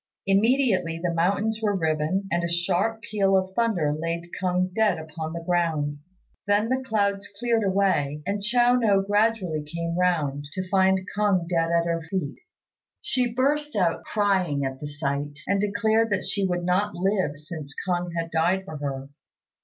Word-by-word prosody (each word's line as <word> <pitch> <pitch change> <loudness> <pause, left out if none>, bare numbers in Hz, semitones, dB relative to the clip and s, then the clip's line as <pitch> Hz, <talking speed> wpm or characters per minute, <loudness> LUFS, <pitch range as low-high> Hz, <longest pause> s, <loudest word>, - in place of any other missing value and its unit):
Immediately 195 -5 +2
the 175 -1 0
mountains 200 +6 +1
were 205 -2 +1
riven, 160 +3 0
and 170 0 +1
a - - +1
sharp 175 +6 0
peal 195 -2 +2
of 190 0 -2
thunder 190 -11 +1
laid 165 +2 -4
K'ung 185 0 0
dead 210 -4 +2
upon 160 0 -6
the 170 0 -6
ground. 160 -4 0 0.5
Then 205 +2 +2
the 260 +1 0
clouds 200 -4 0
cleared 230 -1 +1
away, 185 -7 +1
and 200 +2 -2
Chiao 240 +4 +3
no 210 -6 +3
gradually 205 -5 +1
came 170 +2 -4
round, 155 -6 0
to 185 0 -4
find 190 -1 +3
K'ung 200 -5 +2
dead 165 -2 +1
at 170 0 +2
her 170 -1 -1
feet. 165 -3 -4 0.6
She 250 -2 0
burst 290 +4 0
out 180 -5 +1
crying 185 -9 +1
at 135 0 -4
the 150 - -5
sight, 145 0 -3
and 200 0 +1
declared 220 +2 +2
that 205 -2 -1
she 200 -2 +1
would 175 -1 -2
not 190 +4 +1
live 185 -5 0
since 150 -2 -7
K'ung 175 -1 0
had 165 0 -4
died 175 +4 +1
for 155 -5 -7
her. 140 -1 -4
185 Hz, 170 wpm, -25 LUFS, 165-205 Hz, 0.6 s, Chiao